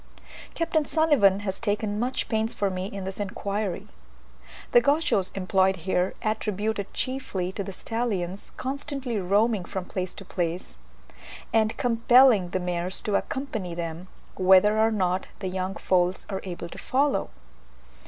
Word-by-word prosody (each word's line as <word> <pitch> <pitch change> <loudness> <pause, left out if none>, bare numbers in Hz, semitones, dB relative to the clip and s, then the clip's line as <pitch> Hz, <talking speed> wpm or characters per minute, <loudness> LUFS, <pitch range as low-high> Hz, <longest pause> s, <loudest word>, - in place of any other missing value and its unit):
Capt. 330 0 -2
Sulivan 265 -12 +4
has 190 -2 -3
taken 210 -1 -1
much 250 +3 -1
pains 220 0 0
for 200 -2 0
me 185 0 -3
in 200 -1 -6
this 190 +1 -5
inquiry. 200 -1 -3 0.8
The 240 - +7
Gauchos 280 - +2
employed 190 0 +2
here 185 -1 +1
attribute 215 0 -1
it 200 - -5
chiefly 230 -9 -2
to 200 - -4
the 195 - -6
stallions 200 -3 -3
constantly 270 -3 -3
roaming 200 +2 +2
from 190 0 -5
place 185 -1 -4
to 195 - -10
place, 175 -1 -3 0.8
and 220 -1 +2
compelling 235 -4 +5
the 185 - -1
mares 180 +1 -2
to 210 - -2
accompany 220 -12 -3
them, 170 +1 -5 0.3
whether 190 +3 +5
or 220 +1 +5
not 185 -4 0
the 190 - -4
young 185 +1 -3
foals 180 0 +1
are 190 - -3
able 175 -2 -5
to - - -9
follow. 275 +2 +1
200 Hz, 145 wpm, -26 LUFS, 185-225 Hz, 0.8 s, The